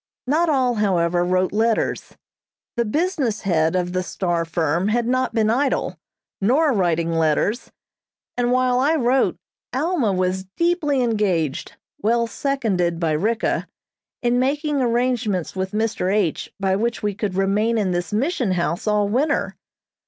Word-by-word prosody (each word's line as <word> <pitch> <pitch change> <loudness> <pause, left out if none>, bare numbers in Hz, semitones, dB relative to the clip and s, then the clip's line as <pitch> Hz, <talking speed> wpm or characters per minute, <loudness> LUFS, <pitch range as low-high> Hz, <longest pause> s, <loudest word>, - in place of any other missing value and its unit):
Not 315 +6 +2
all, 260 -4 +2
however, 175 -3 +2
wrote 185 +1 +1
letters. 225 +1 0 0.6
The 235 - +1
business 290 - -1
head 165 -3 +1
of 180 -1 -1
the 185 - 0
"Star" 175 -2 -2
firm 165 +2 0
had 235 +2 +1
not 255 0 0
been 220 -1 +3
idle, 270 +3 0 0.5
nor 275 +8 +3
writing 170 -5 +1
letters, 165 - 0 0.6
and 245 0 0
while 250 0 +2
I 295 +5 +3
wrote 260 -2 +2 0.3
Alma 285 - 0
was 185 0 -1
deeply 325 -6 +1
engaged, 190 - -1 0.2
well 235 +2 +2
seconded 220 -11 -1
by 165 -2 0
Ricka, 215 +9 0 0.6
in 245 0 +2
making 285 +2 0
arrangements 235 -7 0
with 190 0 -2
Mr. 210 -3 -1
H. 200 -6 0
by 190 -1 +1
which 230 +3 -2
we 205 -1 0
could 200 -2 -3
remain 205 +4 +1
in 200 -4 0
this 175 +2 -2
Mission 245 - 0
House 170 +2 -2
all 210 -1 +2
winter. 260 +9 0
215 Hz, 145 wpm, -22 LUFS, 185-255 Hz, 0.6 s, been